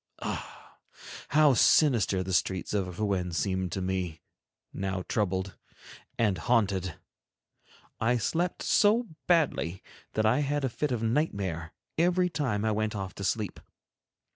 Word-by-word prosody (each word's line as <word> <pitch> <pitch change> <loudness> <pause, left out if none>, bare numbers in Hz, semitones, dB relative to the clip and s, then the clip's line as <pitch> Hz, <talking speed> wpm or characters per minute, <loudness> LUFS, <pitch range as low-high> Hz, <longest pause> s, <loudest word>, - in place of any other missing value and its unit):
Ah! - - -7 0.5
how 150 -2 +5
sinister 115 -8 +4
the 95 0 -4
streets 95 +1 0
of 90 -3 -2
Rouen 95 -4 0
seemed 95 +3 -1
to 95 - -2
me, 90 -4 -3 0.5
now 95 -1 -3
troubled 95 -4 -1 0.6
and 105 -6 +1
haunted! 100 -7 +1 1.0
I 120 +2 +2
slept 165 +10 -1
so 220 +3 +3 0.2
badly 145 - +1 0.3
that 110 - +1
I 115 +5 +4
had 145 -1 0
a - - 0
fit 145 +4 -2
of 120 -2 -1
nightmare 100 - -1 0.3
every 180 +1 +3
time 120 -10 -1
I 110 - +2
went 110 0 -1
off 95 -2 -4
to 100 - -7
sleep. 105 +1 -1
105 Hz, 135 wpm, -29 LUFS, 95-135 Hz, 1.0 s, how